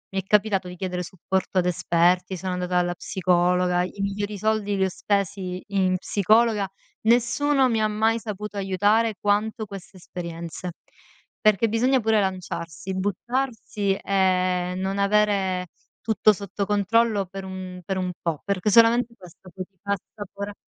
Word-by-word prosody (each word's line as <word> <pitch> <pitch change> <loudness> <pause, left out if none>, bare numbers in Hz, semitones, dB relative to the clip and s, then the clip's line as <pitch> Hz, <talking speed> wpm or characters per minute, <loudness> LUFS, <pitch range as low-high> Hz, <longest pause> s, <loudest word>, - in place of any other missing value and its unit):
mi 195 - +1
è - - -29
capitato 200 -2 +2
di 180 - -8
chiedere 180 -1 -3
supporto 185 +2 -3
ad 180 - 0
esperti, 180 +1 +2
sono 185 +1 -3
andata 180 0 -1
alla 175 0 +1
psicologa, 180 0 +1
i 190 +2 -7
migliori 205 +1 -2
soldi 210 -1 0
li 190 - +2
ho - - 0
spesi 190 -1 -2
in 185 -2 +1
psicologa, 210 +1 +2 0.3
nessuno 255 +4 +3
mi 225 -2 +1
ha 215 - +3
mai 220 +2 +1
saputo 210 -1 -6
aiutare 205 +3 +2
quanto 215 +2 0
queste 195 -1 -10
esperienze. 170 0 -7 0.7
Perché 215 +1 +4
bisogna 250 +4 +2
pure 220 -1 +3
lanciarsi, 185 -2 -4
buttarsi 210 0 -1
e 185 -2 +1
non 195 +1 -2
avere 200 -3 +2 0.4
tutto 215 -1 +4
sotto 200 0 -4
controllo 205 0 +2
per 195 +1 -7
un 185 -1 -7
per 190 -1 -2
un 180 -1 -1
po', 165 -4 -2
perché 200 0 0
solamente 230 +2 +5
questo 180 +1 -15
poi 185 -1 -6
ti 195 - -45
fa 200 0 0
assapora 205 0 -8
195 Hz, 150 wpm, -24 LUFS, 185-210 Hz, 0.7 s, solamente